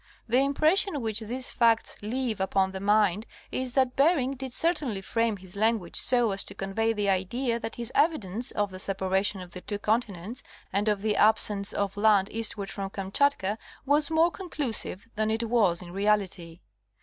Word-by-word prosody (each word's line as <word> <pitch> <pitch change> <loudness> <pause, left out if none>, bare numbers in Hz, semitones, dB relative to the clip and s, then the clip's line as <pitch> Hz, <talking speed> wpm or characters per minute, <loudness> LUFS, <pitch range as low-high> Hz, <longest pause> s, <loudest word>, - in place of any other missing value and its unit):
The 240 +3 +3
impression 310 +5 +2
which 220 -2 0
these 245 +4 0
facts 230 -2 +2
leave 225 -1 -2
upon 190 0 +1
the 190 - -6
mind 210 +1 +2 0.2
is 255 -1 -3
that 260 -2 +1
Bering 280 -2 +3
did 265 -1 -6
certainly 300 - -1
frame 230 +1 0
his 185 0 -12
language 215 -3 0
so 245 -4 +3
as 195 0 0
to - - -6
convey 210 +4 -1
the 210 -2 -1
idea 230 +6 0
that 225 - -6
his 240 0 -2
evidence 245 - +1
of 205 -1 0
the 185 - -8
separation 190 0 0
of 180 -1 -10
the 180 - -9
two 205 - -4
continents 215 0 -2 0.3
and 205 +2 0
of 210 -1 0
the 215 -1 +1
absence 210 -2 +3
of 200 0 -2
land 205 -2 +3
eastward 215 -3 -2
from 195 -1 -5
Kamchatka 200 +2 0 0.3
was 290 +2 +3
more 325 +2 +3
conclu 305 - -4
sive 205 0 -2
than 215 0 +1
it 225 +1 -1
was 205 -7 +2
in 175 - -10
reality. 190 -4 -1
215 Hz, 180 wpm, -27 LUFS, 195-250 Hz, 0.3 s, The